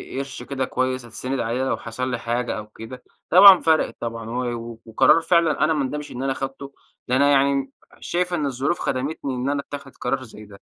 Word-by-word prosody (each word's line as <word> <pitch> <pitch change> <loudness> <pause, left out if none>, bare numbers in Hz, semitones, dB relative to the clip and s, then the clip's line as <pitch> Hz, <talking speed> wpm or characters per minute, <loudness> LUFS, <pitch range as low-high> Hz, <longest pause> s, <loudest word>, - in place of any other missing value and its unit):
ق - - -2
قرش 135 0 -6
كده 135 -2 -3
كويس 130 -1 -2
أتسند 125 +3 -4
عليه 120 +3 -1
لو 130 - -1
حصل 125 +3 -4
لي 125 - -2
حاجة 120 0 -2
أو 105 0 -7
كده، 115 +4 -11 0.3
طبعًا 190 +1 +9
فرقِت 160 -1 +2
طبعًا، 115 -1 -5
و 120 -1 -4
وقرار 115 +8 +4
فعلًا 170 -2 +2
أنا 155 +1 +3
ما 150 -3 0
اندمش 150 +3 -5
إن 125 - -5
أنا 135 0 0
خدته، 135 +1 -6 0.3
ده 125 - +1
أنا 140 +2 +4
يعني 135 -1 +2 0.3
شايف 180 +1 -2
إن 155 -4 0
الظروف 140 +5 -1
خدمتني 135 0 -3
إن 125 +2 -2
أنا 145 0 0
أتخِذ 140 -1 -7
قرار 135 0 -3
زي 110 -3 -12
ده. 100 -1 -15
130 Hz, 205 wpm, -22 LUFS, 120-140 Hz, 0.3 s, طبعًا